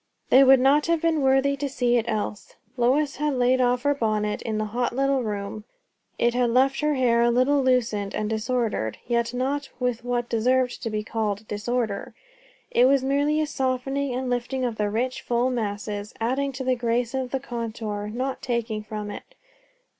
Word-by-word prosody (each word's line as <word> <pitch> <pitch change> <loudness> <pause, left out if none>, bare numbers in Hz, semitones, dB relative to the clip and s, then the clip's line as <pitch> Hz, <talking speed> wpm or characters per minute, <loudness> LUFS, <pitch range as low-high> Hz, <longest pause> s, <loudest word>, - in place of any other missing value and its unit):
They 265 - +8
would 265 0 +7
not 280 +4 +4
have 335 -1 +2
been 320 -2 +1
worthy 270 +1 +3
to 280 0 -3
see 245 -2 +1
it 230 - 0
else. 210 -2 -3 0.2
Lois 270 +4 +1
had 295 -1 0
laid 255 +1 +3
off 245 0 +2
her 285 0 +3
bonnet 215 -5 -1
in 220 -2 -3
the 215 - -1
hot 240 0 -1
little 275 0 +2
room; 210 -1 -4 0.5
it 235 0 +2
had 245 -1 +2
left 265 +3 +3
her 300 -1 +1
hair 240 -3 +3
a 235 - +4
little 255 +4 +3
loosened 230 -6 +1
and 215 - -1
disordered; 220 - -1
yet 235 -1 0
not 270 +3 -2
with 250 -2 -1
what 245 -1 -1
deserved 250 +2 +1
to 230 - -3
be 215 -1 -2
called 215 -1 -3
disorder; 210 0 -3 0.6
it 245 - +5
was 270 0 +4
merely 285 +3 +1
a - - +1
softening 270 -1 -1
and 260 0 -2
lifting 250 +1 -1
of 235 -3 -3
the 210 -1 0
rich, 245 +4 -2
full 245 +2 0
masses, 205 -2 -4
adding 265 +5 0
to 260 +1 -5
the 255 0 +1
grace 240 0 -1
of 260 -1 -2
the 270 - -2
contour, 225 -4 -4
not 260 +4 -3
taking 235 -3 -2
from 210 -1 -6
it. - - -10
245 Hz, 190 wpm, -25 LUFS, 225-265 Hz, 0.6 s, They